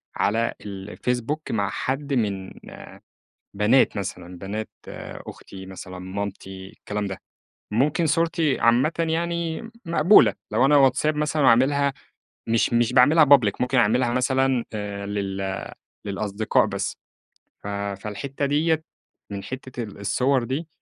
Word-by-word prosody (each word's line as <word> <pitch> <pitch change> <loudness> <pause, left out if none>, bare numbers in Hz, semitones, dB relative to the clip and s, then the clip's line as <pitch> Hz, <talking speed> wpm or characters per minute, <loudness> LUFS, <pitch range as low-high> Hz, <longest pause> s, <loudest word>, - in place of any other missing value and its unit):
على 115 +3 +1
الفيسبوك 120 +8 -4
مع 100 -3 0
حد 140 +2 -3
من 100 -6 -1 1.0
بنات 105 +3 +3
مثلًا، 90 -2 -6
بنات 105 +3 -5 0.6
أختي 95 -1 -10
مثلًا 95 -1 -9
مامتي 95 0 -6
الكلام 105 0 -5
ده، 95 -1 -5 0.5
ممكن 145 +8 +2
صورتي 165 -1 +1
عامةً 120 +6 +4
يعني 170 +4 -1 0.2
مقبولة، 170 +4 +5 0.2
لو 120 +5 +3
أنا 145 +1 +5
واتساب 140 +3 +3
مثلًا 150 -1 +1
أعملها 140 +4 +4 0.5
مش 115 +1 +2
مش 120 +1 +2
باعملها 150 +5 +6
public، 135 -8 +6
ممكن 125 +1 +1
أعملها 120 +1 +3
مثلًا 130 0 +1
آآ 100 -1 -4
للـ‑ 95 -1 -3 0.3
للأصدقاء 100 +1 0
بس، - - -3 0.7
ف - - -6
فالحتّة 100 +7 -4
ديَّة 155 +3 +1 0.5
من 100 -1 -5
حتّة 130 -2 -6
الـ‑ 105 -2 -10
الصوَر 125 +6 +1
دي، 135 +7 -3
120 Hz, 120 wpm, -24 LUFS, 100-140 Hz, 1.0 s, باعملها